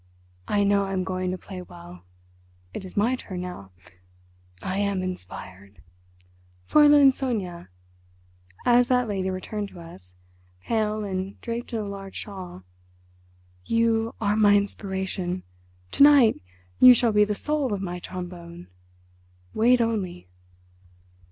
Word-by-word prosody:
I 205 Hz, -1 st, +2 dB
know 200 Hz, 0 st, +2 dB
I 195 Hz, -, -4 dB
am 185 Hz, -1 st, 0 dB
going 185 Hz, 0 st, -2 dB
to 185 Hz, -, -3 dB
play 185 Hz, +1 st, -9 dB
well. 170 Hz, -, -13 dB, 0.7 s
It -, -, -6 dB
is 185 Hz, -, -12 dB
my 230 Hz, +5 st, +2 dB
turn 185 Hz, -7 st, -7 dB
now. 180 Hz, -, -8 dB, 0.9 s
I 185 Hz, -, -3 dB
am 200 Hz, -2 st, 0 dB
inspired. 100 Hz, -, -8 dB, 0.9 s
Fräulein 290 Hz, -2 st, +6 dB
Sonia"—as 90 Hz, -, -3 dB
that 250 Hz, -1 st, +2 dB
lady 190 Hz, -3 st, -2 dB
returned 200 Hz, +2 st, -4 dB
to 180 Hz, -, -13 dB
us, 95 Hz, -, -13 dB, 0.5 s
pale 215 Hz, -1 st, -1 dB
and 190 Hz, 0 st, -4 dB
draped 235 Hz, +1 st, -5 dB
in 230 Hz, -, -2 dB
a 215 Hz, -, -2 dB
large 195 Hz, -1 st, -8 dB
shawl—"you 90 Hz, -, -5 dB
are 210 Hz, -1 st, +1 dB
my 205 Hz, -1 st, +5 dB
inspiration. 190 Hz, -2 st, -2 dB, 0.5 s
To -, -, -2 dB
night 280 Hz, -6 st, +6 dB, 0.4 s
you 250 Hz, -1 st, +9 dB
shall 235 Hz, -1 st, +2 dB
be 210 Hz, 0 st, +4 dB
the 210 Hz, 0 st, -1 dB
soul 300 Hz, 0 st, -1 dB
of 200 Hz, -, -1 dB
my 180 Hz, -1 st, -4 dB
trombone. 175 Hz, -, -8 dB, 0.8 s
Wait 240 Hz, +3 st, +4 dB
only." 195 Hz, -, -2 dB
190 Hz, 125 wpm, -25 LUFS, 170-220 Hz, 0.9 s, you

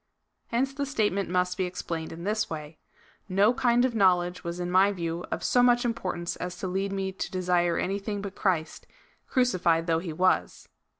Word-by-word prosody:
Hence 265 Hz, +4 st, 0 dB
the 280 Hz, 0 st, -3 dB
statement 205 Hz, -8 st, 0 dB
must 180 Hz, +1 st, 0 dB
be 185 Hz, -, +1 dB
ex 180 Hz, 0 st, -6 dB
plained 160 Hz, -1 st, -4 dB
in 165 Hz, +1 st, -8 dB
this 215 Hz, +2 st, -1 dB
way: 155 Hz, -1 st, -7 dB, 0.2 s
" -, -, -32 dB
No 210 Hz, +4 st, +6 dB
kind 245 Hz, -1 st, +3 dB
of 255 Hz, -, -1 dB
knowledge 180 Hz, -4 st, +2 dB
was 170 Hz, 0 st, -4 dB
in 175 Hz, 0 st, -3 dB
my 190 Hz, +2 st, +5 dB
view 170 Hz, -2 st, -3 dB
of -, -, -3 dB
so 245 Hz, -, +3 dB
much 245 Hz, 0 st, +4 dB
importance 185 Hz, -7 st, -2 dB
as 180 Hz, 0 st, -5 dB
to 190 Hz, -, -4 dB
lead 195 Hz, +2 st, -1 dB
me 195 Hz, -1 st, -2 dB
to 190 Hz, -, -5 dB
desire 180 Hz, -2 st, +1 dB
any 195 Hz, +2 st, -1 dB
thing 205 Hz, 0 st, -4 dB
but 200 Hz, -1 st, -6 dB
Christ, 170 Hz, -7 st, -1 dB, 0.4 s
crucified 185 Hz, -, +2 dB
though 165 Hz, -1 st, +1 dB
he 170 Hz, -1 st, -5 dB
was." 185 Hz, +4 st, 0 dB
185 Hz, 200 wpm, -27 LUFS, 175-215 Hz, 0.4 s, No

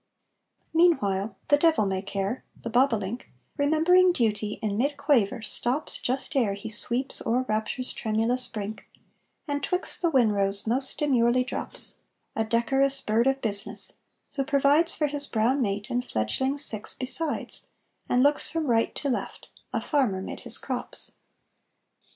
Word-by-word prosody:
Meanwhile 225 Hz, -, +2 dB
the 290 Hz, -, +6 dB
devil 315 Hz, -8 st, +3 dB
may 190 Hz, -1 st, -1 dB
care, 200 Hz, +4 st, -3 dB, 0.2 s
the 230 Hz, -, -6 dB
bobolink, 235 Hz, -3 st, +1 dB, 0.3 s
Remembering 320 Hz, +5 st, +4 dB
duty, 215 Hz, -7 st, 0 dB
in 210 Hz, -2 st, -2 dB
mid 280 Hz, +6 st, 0 dB
quaver 255 Hz, -5 st, +2 dB
stops 255 Hz, +6 st, -1 dB
Just 265 Hz, +4 st, -2 dB
ere 220 Hz, -7 st, +2 dB
he 205 Hz, +3 st, -7 dB
sweeps 240 Hz, +5 st, +2 dB
o'er 245 Hz, +3 st, +1 dB
rapture's 220 Hz, +4 st, -1 dB
tremulous 225 Hz, +3 st, 0 dB
brink, 215 Hz, -1 st, -6 dB, 0.6 s
And 285 Hz, -1 st, -2 dB
'twixt 360 Hz, +5 st, -1 dB
the 345 Hz, -, +3 dB
winrows 205 Hz, -7 st, +2 dB
most 260 Hz, +4 st, -1 dB
demurely 250 Hz, -4 st, +3 dB
drops, -, -, -4 dB, 0.4 s
A 220 Hz, -, +1 dB
decorous 270 Hz, +5 st, +2 dB
bird 230 Hz, +1 st, +1 dB
of 270 Hz, 0 st, +1 dB
business, 200 Hz, -3 st, -2 dB, 0.4 s
who 275 Hz, -, +2 dB
provides 285 Hz, +4 st, +3 dB
For 305 Hz, -, +1 dB
his 290 Hz, -1 st, +1 dB
brown 245 Hz, +5 st, +1 dB
mate 205 Hz, -2 st, -2 dB
and 245 Hz, +1 st, 0 dB
fledglings 265 Hz, -, -1 dB
six 215 Hz, -1 st, -3 dB
besides, 270 Hz, +5 st, -3 dB, 0.4 s
And 250 Hz, +1 st, +3 dB
looks 290 Hz, +1 st, +2 dB
from 325 Hz, -1 st, -2 dB
right 230 Hz, -4 st, +1 dB
to 290 Hz, -, -3 dB
left, 255 Hz, -, -4 dB, 0.2 s
a -, -, 0 dB
farmer 235 Hz, -11 st, 0 dB
mid -, -, -6 dB
his -, -, -4 dB
crops. -, -, -2 dB
250 Hz, 145 wpm, -26 LUFS, 215-285 Hz, 0.6 s, the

